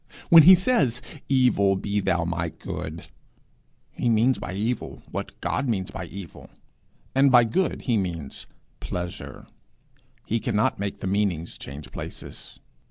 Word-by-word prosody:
When 165 -1 +11
he 185 +5 +10
says, 170 - +2 0.3
'Evil, 125 -7 +3
be 100 +2 -1
thou 90 -3 +1
my 85 0 -2
good,' 80 0 -7 0.9
he 120 - -1
means 115 +3 +3
by - - -5
evil 110 +6 -3
what - - -6
God 140 - -1
means 95 -5 -1
by 95 - -6
evil, 95 -1 -10 0.6
and 135 0 +4
by 120 -2 +7
good 155 +10 -1
he 120 -4 +1
means 85 -8 -4 0.3
pleasure. 90 -1 -6 0.8
He 115 - 0
cannot 105 -4 0
make 100 -1 -4
the - - -4
meanings 95 -4 -1
change 70 +2 -9
places. - - -8
100 Hz, 140 wpm, -25 LUFS, 90-125 Hz, 0.9 s, When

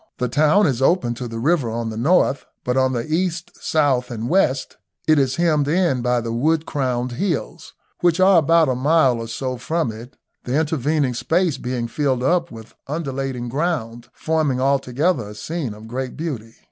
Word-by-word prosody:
The 125 - -1
town 155 - +3
is 135 -5 0
open 135 -4 +2
to 120 +1 -6
the 115 -1 -6
river 140 0 +1
on 115 0 -3
the - - -6
north, 140 +2 +2 0.2
but 125 - -1
on 130 0 +2
the 120 -2 -2
east, 170 +2 -2
south, 135 -5 +1
and 115 -1 -4
west 145 -6 +1 0.3
it 155 -1 +5
is 130 -2 +1
hemmed 155 -4 +2
in 160 -5 +1
by 125 0 +1
the 115 0 -4
wood 155 +6 +1
crowned 125 -3 -2
hills, 170 +4 -3 0.2
which 175 0 +2
are 185 -1 +6
about 165 +1 +4
a 130 - +1
mile 130 -1 +3
or 115 - -5
so 130 +3 -4
from 155 +2 -1
it, 115 +5 -11 0.3
the 130 +5 0
intervening 150 -3 0
space 165 +5 0
being 125 -1 -3
filled 130 -1 -1
up 170 +4 +1
with 110 -3 -12
undulating 135 -4 -3
ground, 120 -5 -3
forming 155 -5 0
altogether 135 - +1
a 105 - -10
scene 135 0 -4
of 110 +1 -12
great 130 +2 -5
beauty. 130 -9 -5
135 Hz, 185 wpm, -21 LUFS, 120-160 Hz, 0.3 s, are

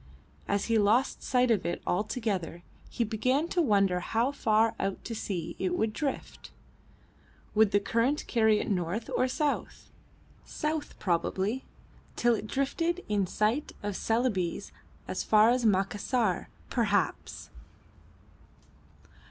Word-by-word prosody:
As 200 0 0
he 230 -1 +2
lost 220 +6 +2
sight 250 -1 +2
of 215 - +2
it 170 - -2
altogether 190 -4 -2 0.3
he 240 - -1
began 255 +8 0
to 355 - +1
wonder 200 - +3
how 230 +8 0
far 225 -4 +2
out 195 0 -3
to 230 - -4
sea 180 -6 -4
it 185 -1 0
would 220 0 0
drift. 285 0 -4 1.0
Would 220 -1 +5
the 205 - +3
current 235 +8 0
carry 220 -3 +3
it - - -3
north 185 +3 -2
or 255 - +2
south? 295 +2 -2 0.5
South, 305 0 -3
probably, 195 +6 -1 0.5
till 240 0 +3
it 215 -1 -3
drifted 330 +8 -1
in 200 -3 +1
sight 220 +10 0
of 205 -1 -3
Celebes, 225 -7 -1 0.4
as - - -2
far 215 +2 +5
as 245 -2 +2
Macassar, 205 +1 0 0.2
perhaps! 210 -4 -1
220 Hz, 125 wpm, -29 LUFS, 200-250 Hz, 1.0 s, Would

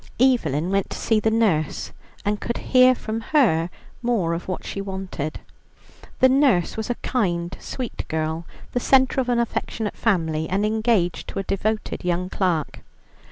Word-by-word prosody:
Evelyn 185 - +2
went 195 -1 +1
to - - -5
see 220 -1 +2
the 220 - +2
nurse, 210 -9 +1 0.3
and 205 0 0
could 235 - -2
hear 255 0 +5
from 225 -1 -4
her 215 - +2 0.3
more 225 -9 +1
of 170 - -4
what 185 - -4
she 195 - -4
wanted. 190 -6 -5 0.8
The 260 - +8
nurse 260 -9 +3
was 220 +1 -4
a 245 - 0
kind, 175 -8 0
sweet 250 -3 -5
girl, 160 +1 -2 0.2
the 245 - 0
centre 265 +1 +4
of 250 - -3
an 240 - +2
affectionate 230 -2 -2
family, 160 -7 0
and 200 +3 +1
engaged 215 -5 +1
to - - -7
a 195 - -1
devoted 215 +3 -2
young 180 +1 -1
clerk. 175 -6 -1
200 Hz, 160 wpm, -23 LUFS, 170-235 Hz, 0.8 s, The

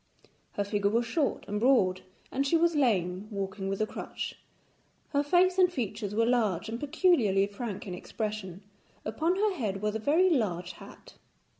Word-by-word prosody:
Her 205 - -1
figure 200 0 0
was 235 +3 +1
short 280 +5 -1
and 205 +1 -2
broad, 205 -7 +3 0.3
and 275 +1 0
she 330 - +4
was 335 0 +2
lame, 195 - +1
walking 195 -1 -4
with 195 +1 -2
a - - +3
crutch. - - -6 0.7
Her 285 -1 +2
face 360 +5 +3
and 360 -1 +5
features 215 - -3
were 230 +1 +3
large 220 -7 +1
and 230 +1 -4
peculiarly 265 - +3
frank 205 0 -6
in 185 - -5
expression; 200 -1 -5 0.4
upon 315 +12 0
her 415 +1 +1
head 210 - -3
was 210 0 0
a 220 - -2
very 325 +10 +3
large 180 - 0
hat. 170 - -14
215 Hz, 170 wpm, -29 LUFS, 195-285 Hz, 0.7 s, and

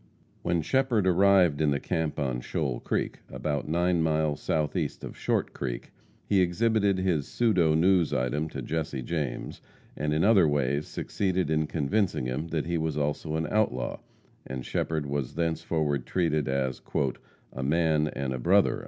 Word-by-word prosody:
When 85 -2 0
Shepherd 130 - +2
arrived 95 -4 +4
in 75 - +3
the 70 0 +1
camp 80 -3 -2
on 65 -4 -1
Shoal 65 -2 -2
Creek, - - -2
about 75 -2 -3
nine 85 +1 +2
miles 80 -2 +1
southeast 75 -2 -1
of - - -7
Short - - -1
Creek, - - -5 0.3
he 100 -2 +3
exhibited 100 +2 +2
his 90 -6 0
pseudo 90 -10 +2
news 90 0 +3
item 65 +5 -1
to 65 -4 -6
Jesse 75 -3 -3
James, 75 -5 -3 0.3
and 75 +1 -1
in 75 +2 +2
other 100 -5 +6
ways 70 0 0
succeeded 95 -5 -1
in 80 -1 +1
convincing 80 +1 0
him 65 +6 -2
that 80 -2 -2
he 85 0 -1
was 80 -2 -2
also 75 +1 -1
an 80 0 0
outlaw, 100 - 0 0.5
and 65 -1 -5
Shepherd 80 -3 -1
was 70 -2 -3
thenceforward 80 -4 -1
treated 80 -5 0
as 65 -1 -1 0.7
"a 65 - -5
man 75 +1 +2
and 70 -3 -3
a 65 - -4
brother." - - +3
80 Hz, 160 wpm, -28 LUFS, 70-90 Hz, 0.7 s, other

